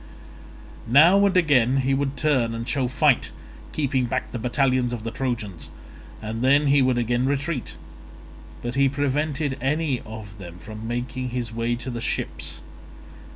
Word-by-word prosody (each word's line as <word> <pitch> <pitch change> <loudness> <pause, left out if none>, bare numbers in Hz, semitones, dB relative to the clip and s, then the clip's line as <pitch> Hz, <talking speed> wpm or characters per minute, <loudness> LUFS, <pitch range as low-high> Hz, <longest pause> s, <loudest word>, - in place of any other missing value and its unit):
Now 165 - +6
and 190 -1 +1
again 135 -7 +4
he 135 +1 +1
would 135 0 -1
turn 130 -7 +1
and 115 +1 -5
show 130 +1 +1
fight, 140 +1 +2 0.4
keeping 135 -4 0
back 130 +2 -3
the 120 - -4
battalions 125 +1 +1
of 115 -3 -5
the 115 - -4
Trojans, 115 - -3 0.5
and 110 +2 -4
then 140 +3 +4
he 140 0 +4
would 130 -1 +2
again 120 +2 +1
retreat; 140 0 -2 0.9
but 120 0 -3
he 135 +1 +3
prevented 145 0 -1
any 140 -1 0
of 110 -1 -10
them 85 -2 -9
from 110 +5 -8
making 125 +2 -3
his 120 -2 -4
way 115 +1 -1
to 125 +2 -6
the 120 -1 -5
ships. - - -3
130 Hz, 155 wpm, -24 LUFS, 115-140 Hz, 0.9 s, Now